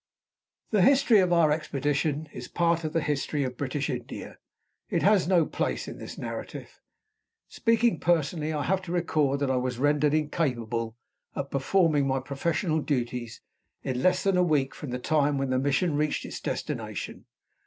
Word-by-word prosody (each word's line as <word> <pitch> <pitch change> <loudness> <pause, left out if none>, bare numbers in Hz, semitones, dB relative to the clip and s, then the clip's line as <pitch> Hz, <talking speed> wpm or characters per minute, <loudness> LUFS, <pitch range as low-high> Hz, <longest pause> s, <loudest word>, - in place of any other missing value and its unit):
The 210 -3 +3
history 260 0 +5
of 180 -2 +2
our 170 -3 +4
expedition 150 0 -1
is - - -7
part 170 -1 +1
of 155 - -2
the 165 0 +1
history 145 0 -1
of 125 -1 -3
British 140 +2 -2
India. 125 -2 -6 0.5
It - - 0
has 200 -3 +4
no 175 -4 +4
place - - -2
in - - -8
this - - -8
narrative. - - -7 0.7
Speaking 230 -5 +2
personally, 160 -2 +1
I 150 -2 -1
have 190 +2 +1
to 180 -2 -7
record 150 -5 +1
that 140 -2 +1
I 130 - +1
was 125 -1 -2
rendered 145 +2 +2
incapable 120 -7 -1 0.4
of 140 - -4
performing 145 0 +2
my 135 0 +1
professional 155 +5 -1
duties 120 -5 -3 0.4
in 130 -1 -2
less 185 - +3
than 195 -2 +2
a 180 - +4
week 145 -6 +1
from 150 - -7
the 125 - -2
time 145 +1 +1
when 135 -1 -1
the 130 - +2
mission 145 +4 +1
reached 150 0 0
its - - -6
destination. - - -4
150 Hz, 170 wpm, -27 LUFS, 135-170 Hz, 0.7 s, history